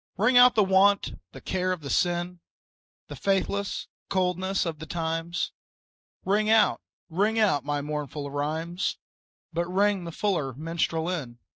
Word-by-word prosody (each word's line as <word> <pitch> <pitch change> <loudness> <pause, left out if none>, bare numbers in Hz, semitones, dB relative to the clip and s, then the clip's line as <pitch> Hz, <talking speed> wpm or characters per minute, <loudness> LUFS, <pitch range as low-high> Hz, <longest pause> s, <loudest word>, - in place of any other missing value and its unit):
Ring 220 +6 +3
out 245 0 +8
the 215 - +5
want, 195 +1 +3 0.2
the - - -10
care 185 0 -1
the 145 -5 -7
sin, 175 0 0 0.7
The - - -9
faithless 200 +1 -1 0.2
coldness 185 +1 0
of 160 -3 -4
the 160 - -8
times; 165 +1 -2 0.7
Ring 210 +2 +2
out, 220 -1 +4 0.3
ring 205 +7 +1
out 205 -10 +3
my 145 -1 -2
mournful 145 -1 -4
rhymes, 160 +5 -2 0.6
But 170 +1 -1
ring 200 -1 +2
the 170 - -5
fuller 165 -8 -1
minstrel 165 +3 -2
in. 140 -10 -4
175 Hz, 140 wpm, -27 LUFS, 160-195 Hz, 0.7 s, out